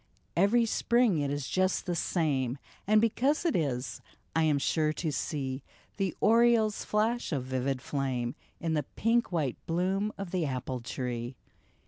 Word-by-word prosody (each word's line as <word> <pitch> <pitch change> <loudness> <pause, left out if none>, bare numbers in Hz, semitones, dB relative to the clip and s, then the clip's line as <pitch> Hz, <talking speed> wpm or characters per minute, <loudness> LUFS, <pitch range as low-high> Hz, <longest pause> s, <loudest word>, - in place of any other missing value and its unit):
" - - -40
Every 210 +7 +4
spring 235 -4 +2
it 145 -1 0
is 145 -1 -2
just 185 0 +1
the 175 - -1
same! 140 -7 0 0.3
And 215 +1 +6
because 260 +9 +2
it 335 - +2
is, 135 -6 -1 0.3
I 165 - +3
am 155 -2 +3
sure 155 +2 +1
to 160 0 -2
see 135 -1 -3 0.4
The 195 -3 -1
oriole's 225 -1 +4
flash 220 +2 0
of 140 -5 -1
vivid 130 0 -2
flame 130 -4 -1 0.3
In 165 -1 -1
the 150 - +2
pink 230 0 +2
white 150 -8 0
bloom 190 +5 0
of 195 -3 -5
the 185 -3 0
apple 130 -1 -3
tree." 120 0 -4
160 Hz, 160 wpm, -30 LUFS, 135-210 Hz, 0.4 s, And